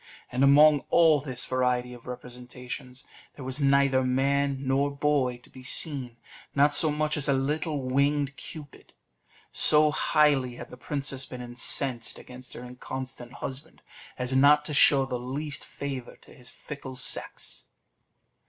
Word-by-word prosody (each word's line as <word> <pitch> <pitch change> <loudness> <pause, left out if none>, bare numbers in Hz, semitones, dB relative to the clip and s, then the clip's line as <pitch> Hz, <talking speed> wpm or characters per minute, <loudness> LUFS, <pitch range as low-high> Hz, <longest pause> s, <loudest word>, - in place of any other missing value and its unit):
And 125 +2 0
among 145 +2 +6
all 160 -4 +4
this 130 -3 -3
variety 125 -1 -1
of 120 0 -14
representations, 125 +1 -9 0.3
there 135 - -9
was 130 +3 -2
neither 140 -1 +3
man 140 +2 +1
nor 140 +2 +1
boy 140 -3 0
to - - -19
be 130 - -13
seen 130 -2 -1 0.4
not 145 +1 +4
so 155 - +4
much 150 0 -1
as 145 0 +2
a - - +4
little 145 +2 -2
winged 140 +2 0
Cupid: 150 -1 -11 0.6
so 150 0 +5
highly 145 -5 +2
had - - -10
the - - -9
princess 135 -1 -1
been 125 - -8
incensed 120 0 0
against 125 0 -10
her 125 - -9
inconstant 125 0 -7
husband, 135 +5 -8 0.3
as 125 +1 -1
not 145 +2 +5
to 150 - -4
show 135 -1 +5
the 125 -2 -4
least 140 +4 -4
favour 135 -3 -7
to - - -18
his 125 -3 -13
fickle 140 -3 -9
sex. - - -2
135 Hz, 150 wpm, -27 LUFS, 125-145 Hz, 0.6 s, among